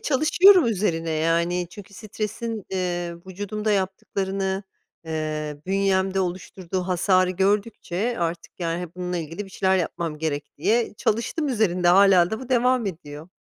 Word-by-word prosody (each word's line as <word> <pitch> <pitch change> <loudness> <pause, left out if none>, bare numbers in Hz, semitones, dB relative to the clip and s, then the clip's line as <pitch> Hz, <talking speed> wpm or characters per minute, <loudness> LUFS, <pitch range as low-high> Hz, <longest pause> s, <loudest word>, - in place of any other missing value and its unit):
çalışıyorum 345 - +5
üzerine, 175 -7 0
yani, 170 +3 +1
çünkü 200 0 -12
stresin, 215 +1 -5
eee, 175 -2 -2
vücudumda 205 +3 -3
yaptıklarını, 195 0 -2 0.4
eee, 155 -2 -3
bünyemde 195 0 +1
oluşturduğu 185 0 -4
hasarı 185 0 +2
gördükçe 200 +3 -1
artık, 170 +1 -4
yani, 170 +1 -2
e, 175 0 -8
bununla 180 0 -3
ilgili 165 +5 -5
bir 195 - -14
şeyler 190 0 +2
yapmam 170 -3 -3
gerek 150 -2 -4
diye 215 +6 +1
çalıştım 235 +10 -1
üzerinde. 185 -8 +1
Hâlâ 185 -1 +6
da 220 - -3
bu 255 - -9
devam 250 -2 +2
ediyor. 155 -2 -7
190 Hz, 135 wpm, -24 LUFS, 170-210 Hz, 0.4 s, Hâlâ